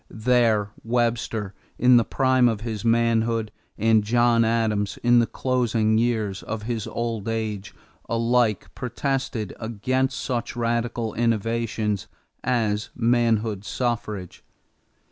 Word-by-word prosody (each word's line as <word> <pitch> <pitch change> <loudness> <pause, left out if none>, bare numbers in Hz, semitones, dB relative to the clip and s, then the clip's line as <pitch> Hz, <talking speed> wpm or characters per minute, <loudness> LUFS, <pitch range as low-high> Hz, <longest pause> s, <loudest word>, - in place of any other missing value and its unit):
There 110 -3 +2
Webster, 115 -3 -1 0.2
in 125 0 +6
the 120 - +4
prime 130 0 +3
of 110 -2 -3
his 110 -3 -4
manhood, 115 -1 +1 0.3
and 110 0 +3
John 120 +1 +3
Adams, 110 -3 0
in 120 0 +5
the 115 - +2
closing 115 -4 +1
years 110 -5 0
of 110 -1 -5
his 115 -1 -3
old 115 -3 -3
age, 110 -3 -3 0.3
alike 115 -2 +1
protested 125 -3 -3
against 130 +4 -1
such 120 -3 -3
radical 115 -1 -1
innovations 115 -2 -1 0.4
as 110 -4 0
manhood 115 -4 +1
suffrage. 110 -6 -3
115 Hz, 110 wpm, -24 LUFS, 110-120 Hz, 0.4 s, in